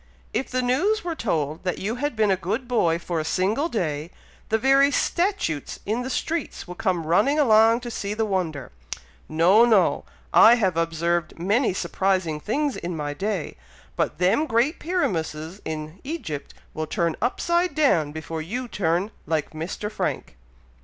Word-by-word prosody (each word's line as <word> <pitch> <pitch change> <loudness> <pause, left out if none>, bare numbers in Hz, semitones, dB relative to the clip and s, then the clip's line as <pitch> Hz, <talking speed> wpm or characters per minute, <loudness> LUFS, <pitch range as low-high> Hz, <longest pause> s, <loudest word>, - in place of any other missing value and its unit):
If 265 - -1
the 255 0 -1
news 360 +14 +1
were 345 -1 -2
told 160 - -2
that 180 -2 -1
you 215 +5 -3
had 290 -1 -2
been 215 -2 +3
a - - +4
good 210 +8 -3
boy 175 -9 +2
for 170 -1 -3
a - - -1
single 205 - 0
day, 155 - -2 0.4
the 220 - +3
very 270 +4 +5
statutes 340 - -1
in 220 +4 -1
the 255 - -4
streets 320 - -3
would 180 +3 -9
come 185 -7 0
running 265 - +3
along 225 -4 +5
to 240 -1 -6
see 205 -2 -3
the 220 0 0
wonder. 170 - -2 0.6
No! 180 +8 +5
no! 220 -5 +3 0.3
I 230 - +8
have 190 -8 +1
observed 165 0 -1
many 205 +9 +2
surprising 185 -3 0
things 275 - -1
in 170 -1 -4
my 145 -1 -3
day, 195 +2 -3 0.4
but - - -1
them 185 - +2
great 245 +7 +1
pyramuses 175 - -2
in 155 +2 -5
Egypt 265 - -5 0.2
will 155 0 -3
turn 170 0 0
upside 345 +9 +1
down 175 - +3
before 160 +1 -5
you 245 +10 -4
turn 185 0 0 0.2
like 155 -1 -1
Mr. 170 +6 -5
Frank." - - -3
195 Hz, 165 wpm, -24 LUFS, 165-250 Hz, 0.6 s, I